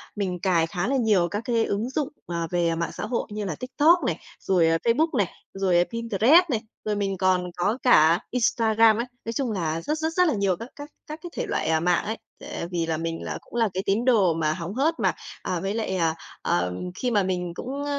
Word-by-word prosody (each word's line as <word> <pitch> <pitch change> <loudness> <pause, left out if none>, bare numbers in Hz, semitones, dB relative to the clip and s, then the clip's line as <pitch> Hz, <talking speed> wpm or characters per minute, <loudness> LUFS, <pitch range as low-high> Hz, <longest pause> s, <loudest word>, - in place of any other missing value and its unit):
mình 185 -4 -2
cài 170 -3 +2
khá 175 +4 -2
là 275 - +1
nhiều 215 -8 +3
các 205 +2 -2
cái 230 -2 +1
ứng 215 +5 -2
dụng, 275 +1 -1 0.2
à, 170 -1 -2
về 170 -2 +1
mạng 170 +1 -2
xã - - -4
hội 235 +2 -2
như 210 0 -4
là 165 -6 -3
TikTok 300 +6 +3
này, 170 - 0 0.2
rồi 180 -3 +2 0.2
Facebook 305 +8 +2
này, 200 - +2 0.3
rồi 180 -2 +2
Pinterest 230 - +4
này, 230 -4 0 0.2
rồi 210 - 0
mình 195 -2 -1
còn 180 -1 +1
có 205 +7 +1
cả 165 -8 +6
Instagram 225 -2 +3
ấy, 235 - -1 0.2
nói 230 - -3
chung 250 -2 -1
là 165 -4 -2
rất, 305 - -2
rất, 320 +1 -2
rất 360 +1 +4
là 310 - +2
nhiều 200 -3 +1
các 230 +7 -9
các 290 0 -9 0.2
các 305 +1 -7
cái 350 - -6
thể - - -3
loại, - - -1
à, 160 0 +3
mạng 175 +1 +1
ấy! 220 +2 -3 0.2
Tệ - - -6
vì 170 -2 0
là 160 -1 -1
mình 165 0 -4
là - - -4
cũng - - -15
là 225 - +3
cái 190 - -2
tín 205 +5 +1
đồ 210 -9 +4
mà 155 -1 0
hóng 170 +2 -5
hớt 305 +7 +1
mà, - - +2 0.3
à, 180 - -2
với 195 +2 -2
lại, 215 -4 -2
à, 165 -3 +1 0.3
ờm, 90 - -1
khi 250 - -1
mà 205 -3 +3
mình 180 -2 -2
cũng 275 +7 -5
200 Hz, 235 wpm, -25 LUFS, 175-240 Hz, 0.3 s, cả